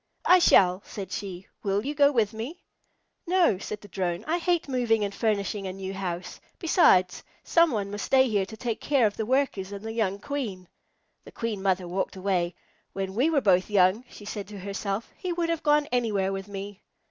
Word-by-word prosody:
"I 365 - +7
shall," 185 - +5
said 195 -2 -8
she. 190 -2 -5 0.2
"Will 200 +2 -1
you 290 - -2
go 285 -1 +5
with 225 -5 +1
me?" 240 +11 -7 0.6
"No," 350 - +3
said 210 +1 -6
the 205 - -12
Drone. 180 -2 -3
"I 335 +3 0
hate 345 -2 0
moving 240 -5 +1
and 200 -1 -2
furnishing 205 -2 -1
a 185 - -4
new 190 0 -6
house. 180 -2 -5 0.2
Besides, 185 - +4 0.2
somebody 275 - +2
must 205 -1 -4
stay 265 -1 +4
here 205 -4 0
to 220 - -10
take 230 -1 -3
care 275 -5 +3
of 205 - 0
the 220 - -3
Workers 255 -7 0
and 200 +1 -7
the 225 - -3
young 205 -4 0
Queen." 210 -6 -5 0.6
The - - -13
Queen 225 -4 -3
Mother 190 -2 0
walked 185 +3 -2
away. 185 -2 -1 0.4
"When 190 -1 -3
we 255 +10 +2
were 300 -4 +2
both 185 -3 +3
young," 200 +3 +3
she 205 - -12
said 205 -1 -5
to 210 0 -9
herself, 200 +2 -4
"he 365 -1 -3
would 335 -1 -1
have 335 -2 -1
gone 295 0 +3
anywhere 210 -6 0
with 195 0 -5
me." 200 0 -7
205 Hz, 200 wpm, -27 LUFS, 195-255 Hz, 0.6 s, I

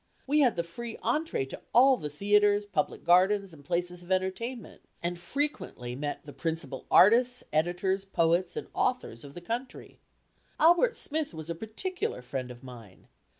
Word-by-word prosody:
We 295 +3 +2
had 255 -5 +4
the 170 - -1
free 225 +7 -7
entrée 275 - 0
to - - -8
all 265 +2 +7
the 150 -11 -5
theatres, 205 +5 +3
public 190 -7 -2
gardens, 190 +2 +3
and 145 -3 -14
places 175 +3 -2
of 175 +1 -11
entertainment, 190 +6 -2 0.2
and 175 0 -2
frequently 175 - -3
met 145 +2 -4
the 145 - -10
principal 165 -4 -4
artists, 245 +5 +5
editors, 180 +5 +1
poets, 175 -1 +1
and - - -4
authors 250 - -1
of 140 -1 -12
the 175 - -7
country. 235 +8 -6 0.6
Albert 345 +9 +5
Smith 305 - -2
was 160 +1 -5
a - - 0
particular 220 - -4
friend 125 0 -4
of 125 0 -11
mine. 115 -7 -13
185 Hz, 160 wpm, -29 LUFS, 160-235 Hz, 0.6 s, all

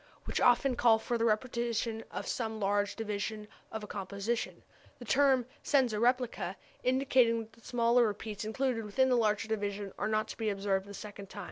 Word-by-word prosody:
which - - -2
often 250 +1 +4
call 230 -2 +5
for 240 +2 -2
the 230 - 0
repetition 230 0 0
of - - -5
some 220 -2 -3
large 205 0 +1
division 210 0 -3 0.2
of 220 -1 -5
a - - -6
composition, 200 +4 -3 0.3
the 245 - -10
term 265 0 +4 0.2
senza 250 -7 +2
replica 250 +1 +1 0.3
indicating 255 -3 +3
that 220 - -17
the 230 - -20
smaller 235 0 +3
repeats 210 0 -5
included 230 +1 -1
within 260 +6 +2
the 250 - +4
larger 215 -2 +2
division 205 -2 -3
are - - 0
not 215 0 +1
to - - -8
be 220 -2 0
observed 195 -1 -1
the 200 - -9
second 205 -2 -9
time. - - -9
225 Hz, 180 wpm, -32 LUFS, 210-240 Hz, 0.3 s, call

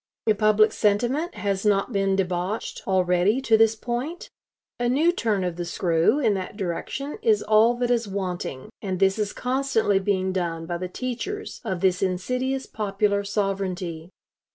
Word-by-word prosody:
If 215 -2 +2
public 215 0 +4
sentiment 240 - 0
has 195 -1 -2
not 205 +2 +1
been 195 -1 +1
debauched 185 +2 -2
already 185 +4 +2
to 230 -4 +4
this 225 0 +4
point, 245 +9 -4 0.5
a 240 0 +1
new 305 +7 +3
turn 220 - 0
of 175 -2 -3
the 175 - -2
screw 170 - +2
in 235 -8 +2
that 190 +1 -5
direction 225 - -4
is 445 -3 +3
all 220 +3 +4
that 245 0 0
is 235 -2 +1
wanting; 180 -9 -4
and 190 -3 -3
this 195 +2 +3
is 210 -1 -1
constantly 250 -6 +1
being 190 -1 0
done 170 -3 -2
by 170 +1 -3
the 185 0 -4
teachers 255 - -5
of 190 -6 -3
this 185 -1 +2
insidious 250 +9 -1
popular 200 -1 0
sovereignty. 190 -5 -2
200 Hz, 160 wpm, -24 LUFS, 185-240 Hz, 0.5 s, public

